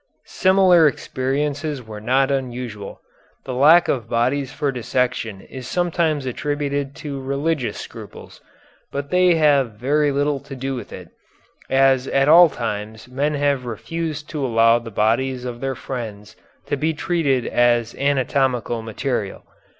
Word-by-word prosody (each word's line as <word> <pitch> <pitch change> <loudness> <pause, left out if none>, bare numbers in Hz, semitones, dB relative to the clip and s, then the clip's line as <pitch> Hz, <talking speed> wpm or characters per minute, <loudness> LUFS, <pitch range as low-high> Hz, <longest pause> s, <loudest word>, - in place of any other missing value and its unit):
Similar 185 -4 +4
experiences 145 +1 -2
were 105 -1 -9
not 130 +4 +2
unusual. 125 -6 -4 0.4
The 130 - -4
lack 155 +7 +6
of 115 -4 -2
bodies 130 +4 0
for 145 -1 -1
dissection 125 -4 -2
is 130 +3 -9
sometimes 170 -5 0
attributed 140 +1 -2
to 140 -2 -4
religious 140 0 -2
scruples, - - -11 0.5
but 140 0 -5
they 180 -1 +4
have 140 -7 +3
very 145 +7 +1
little 145 0 0
to 140 0 -10
do 135 +1 -3
with 125 - -7
it, - - -10 0.6
as 135 -1 +3
at 135 0 +2
all 170 +2 +8
times 110 -3 -5
men 140 +4 -1
have 140 -3 0
refused 155 +5 -5
to 150 -3 -3
allow 115 -1 +4
the 115 -1 -9
bodies 125 +4 0
of 120 -1 -5
their 135 -1 -2
friends 110 -6 -7 0.3
to - - -1
be 155 +3 -1
treated 150 -7 0
as 120 -1 +2
anatomical 130 -4 0
material. 110 -2 -3
135 Hz, 140 wpm, -21 LUFS, 120-145 Hz, 0.6 s, all